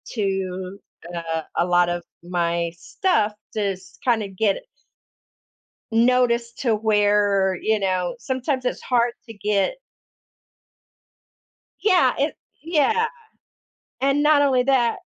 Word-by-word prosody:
to 190 -2 -2 0.3
a 165 -1 -3
a 170 - +3
lot 175 0 +3
of 175 0 -3 0.2
my 170 -1 -1
stuff 215 - 0 0.2
to 215 - -1
s 185 0 -15
kind 235 -3 +2
of 195 -2 -8
get 205 -2 +2
it - - -13 1.3
noticed 235 0 +2
to 235 -4 +1
where, 205 -3 +2
you 220 -1 +1
know, 185 +1 0
sometimes 260 +1 -2
it's 250 - -2
hard 240 -1 +1
to 225 - -9
get 205 - 0 2.1
Yeah, 370 -4 +4
it - - 0 0.3
yeah, 340 +8 +2 1.0
and 275 +2 +2
not 300 -1 +5
only 260 -3 +3
that, 255 -3 +2
215 Hz, 120 wpm, -23 LUFS, 185-255 Hz, 2.1 s, not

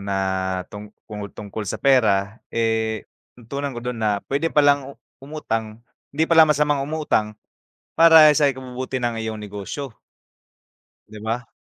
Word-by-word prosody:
na 100 0 -3 0.6
tungku 105 0 -9
tungkol 105 +1 -6
sa - - -2
pera. 110 -6 +2
Eh, 110 -1 -1 0.3
natutunan 140 +4 -5
ko - - -4
dun 125 -2 -4
na 105 -2 +1
pwede 140 +4 0
palang 145 -3 +2 0.2
umutang, 115 -6 -5 0.3
hindi 155 +3 +1
pala 160 -1 +6
masamang 150 -1 +2
umutang 140 -8 -1 0.6
para 160 -2 +8
sa 145 - +4
ikabubuti 130 -1 -4
ng 120 -1 -1
iyong 110 -1 -4
negosyo. 105 +6 -7 1.1
'Di 110 - -11
ba? 115 +2 -3
120 Hz, 130 wpm, -22 LUFS, 110-145 Hz, 1.1 s, para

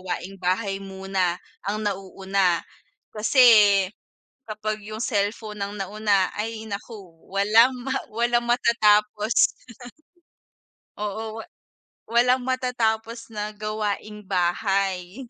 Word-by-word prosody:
gawaing 185 +1 -5
bahay 195 +2 0
muna 190 -2 -2 0.3
ang 210 +2 -1
nauuna. 190 -2 0 0.5
Kasi 220 +5 +2 1.1
kapag 215 0 -4
yung 215 +1 -7
cellphone 210 -1 -2
ng 200 +1 -4
nauna 200 -1 +1
ay 220 +1 -3
nako 200 -3 -8 0.2
walang 215 +6 +5
ma 265 - -1 0.2
walang 240 +1 +1
matatapos. 215 -2 +3 1.4
Oo, 215 +2 -4
wa 225 - -7 0.7
walang 250 +2 +3
matatapos 235 -3 -1
na 210 -1 -4
gawaing 210 0 -4
bahay. 190 +2 -1
210 Hz, 95 wpm, -24 LUFS, 195-225 Hz, 1.4 s, walang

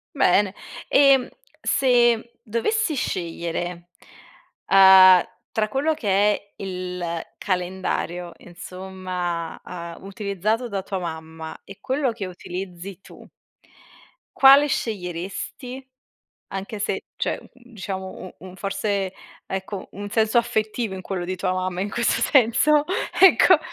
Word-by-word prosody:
Bene, 200 -5 +3 0.3
ehm, 275 -2 +5 0.4
se 240 -3 +3
dovessi 310 - 0
scegliere, 175 - -3 0.8
uhm, 190 -2 +8 0.3
tra 215 -1 0
quello 290 +6 +1
che 245 -9 -5 0.3
è 200 0 -10
il 180 -2 -5 0.4
calendario 180 -1 -2
insomma, 180 -2 -5
uhm, 170 -1 -7
utilizzato 205 +3 -2
da 200 -3 -3
tua 195 0 -4
mamma 160 -2 -7
e 195 - -12
quello 265 -1 0
che 210 -4 -5
utilizzi 185 +1 -7
tu - - -15 1.1
quale 275 +2 +8
sceglieresti? 215 +5 -4 0.6
Anche 195 +2 -5
se - - -2
cioè, - - -1
mhmm, 250 -1 -20
diciamo 190 -2 -5
u 185 - -10
un 185 0 -11
forse 195 -1 -2 0.3
ecco 190 0 -5
un 205 +1 -7
senso 220 +1 +1
affettivo 225 -2 -1
in 190 - -6
quello 185 -1 -4
di 185 +1 -3
tua 185 0 -1
mamma 185 -1 -2
in 200 +2 -2
questo 235 +2 +1
senso 275 +4 +4 0.4
ecco. 370 -2 +7
195 Hz, 115 wpm, -23 LUFS, 180-235 Hz, 1.1 s, uhm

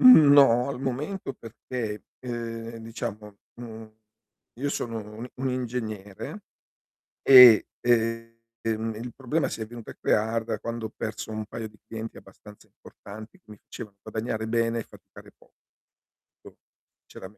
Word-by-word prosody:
no 140 - +8
al 135 -2 -4
momento 135 +5 -3
perché, 115 -3 -6 0.2
ehm, 115 -2 -5
diciamo, 110 -2 -6 0.2
mhmm, 110 -2 -9 0.7
io 145 - -1
sono 115 -5 -3 0.2
un 115 - -6
i 125 - -10
un 130 +1 -1
ingegnere 110 -6 -4 0.8
e, 125 -5 +10
ehm, 115 -1 +2 0.7
il 120 +2 -7
problema 140 +4 0
si - - -5
è 110 - -2
venuto 115 0 -10
a - - -9
crear 110 +1 +1
da - - -3
quando 115 -1 -4
ho - - -18
perso 110 0 -5
un 110 0 -4
paio 110 +1 -6
di 105 0 -20
clienti 110 0 -6
abbastanza 105 -1 -15
importanti 110 +2 -12
che - - -52
mi 105 - -11
facevano 100 -2 -10
guadagnare 110 0 -3
bene 115 0 +1
e - - -4
faticare - - -16
poco. - - -25 1.5
C'era - - -12
me - - -11
115 Hz, 145 wpm, -26 LUFS, 110-125 Hz, 1.5 s, e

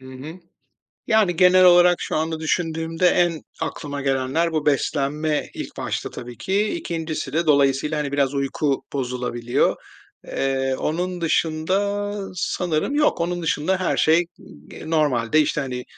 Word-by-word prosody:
Hı - - -16
hı. 130 +4 -8 0.7
Yani, 215 -6 +3
genel 185 +1 +6
olarak 175 0 +6
şu - - -2
anda 160 0 -2
düşündüğümde 165 +1 -1
en 175 -3 +1 0.2
aklıma 145 -2 -4
gelenler, 135 +5 0
bu 155 -2 -2
beslenme 150 +1 0
ilk - - -7
başta - - -3
tabii 120 0 -9
ki. 200 +3 0
2.'si 160 - -4
de 165 +2 0
dolayısıyla, 140 +1 +2
hani, 140 -2 -3
biraz 140 -1 +1
uyku 140 0 -1
bozulabiliyor. 125 -2 -1 0.5
Eee, 135 -1 -1
onun 180 +3 -2
dışında 190 +6 0 0.2
sanırım 175 - -1
yok. 295 - +2
Onun 175 +1 -1
dışında, 165 +4 0
her 185 - 0
şey 160 +2 +4
ig 175 - -5 0.4
eee 155 - -9
normalde, 150 -3 +2
işte, 150 - 0
hani, 125 -2 -4
155 Hz, 145 wpm, -22 LUFS, 140-175 Hz, 0.7 s, genel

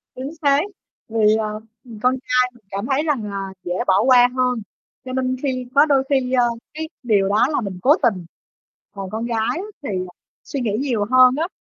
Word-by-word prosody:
Chính 265 +3 -5
xác, 285 -1 +4 0.5
vì, 215 -1 +3
ờ, 215 -1 -2 0.3
ừm, 230 -3 -11
con 255 +1 +3
trai 250 0 +2
mình 240 - -22
cảm 200 +2 -3
thấy 275 +3 +2
rằng 290 -8 0
là 195 -1 -5
dễ 175 - -3
bỏ 190 +2 +4
qua 250 -2 +7
hơn 250 -2 +1 0.5
cho 255 - -6
nên 255 0 0
khi 255 -2 -2
có 285 - +7
đôi 275 -3 +3
khi, 260 -2 +1
ờ, 245 -2 +4 0.3
cái, 315 +1 -5
điều 205 -5 +2
đó 210 +4 +3
là 300 - 0
mình 195 -4 -5
cố 290 +4 +5
tình, 195 -7 +1 0.7
còn 195 -2 -7
con 220 +3 -4
gái 235 -1 -2
á 350 - -3 0.2
thì, - - -4
à, 185 -2 -4 0.3
suy 280 - -5
nghĩ 220 -4 -1
nhiều 240 -7 0
hơn 255 0 +6
á, 330 - 0
250 Hz, 210 wpm, -21 LUFS, 210-265 Hz, 0.7 s, qua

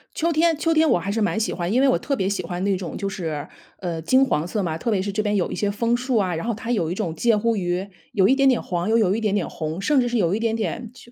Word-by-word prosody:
秋 335 +1 +1
天 325 +1 +3
秋 330 +2 +1
天 315 0 +4
我 175 - +3
还 195 +4 -3
是 225 - -1
蛮 215 +1 +1
喜 220 - -1
欢， 175 +1 -3
因 250 +4 +3
为 275 - +5
我 260 - +3
特 280 - -1
别 190 -7 -1
喜 200 -1 -1
欢 175 +1 -4
那 200 0 +2
种 180 -3 -5
就 200 - -3
是， 160 -6 -4 0.3
呃， 170 -3 -4
金 260 - +4
黄 165 - 0
色 210 +2 -2
嘛， 160 -3 -2
特 230 - -3
别 200 -3 +1
是 200 +1 -3
这 215 - -1
边 210 -1 0
有 185 - 0
一 - - -3
些 205 - 0
枫 230 +3 0
树 250 0 0
啊， 185 -5 +1
然 165 - -4
后 235 - +1
它 230 +2 -5
有 170 -9 0
一 - - -2
种 180 -6 -3
介 230 +1 +2
乎 230 +2 +1
于， 180 0 -2 0.3
有 190 -1 +4
一 265 - +4
点 275 -1 +4
点 255 - +2
黄， 175 +2 -2
又 225 - +4
有 200 -3 +3
一 225 - -2
点 210 -2 +1
点 195 - 0
红， 160 +1 -5
甚 280 +5 +3
至 245 - 0
是 240 - 0
有 180 -4 +2
一 210 - 0
点 225 0 0
点， 225 +1 -3
就 240 -1 -16
210 Hz, 350 characters per minute, -23 LUFS, 180-240 Hz, 0.3 s, 为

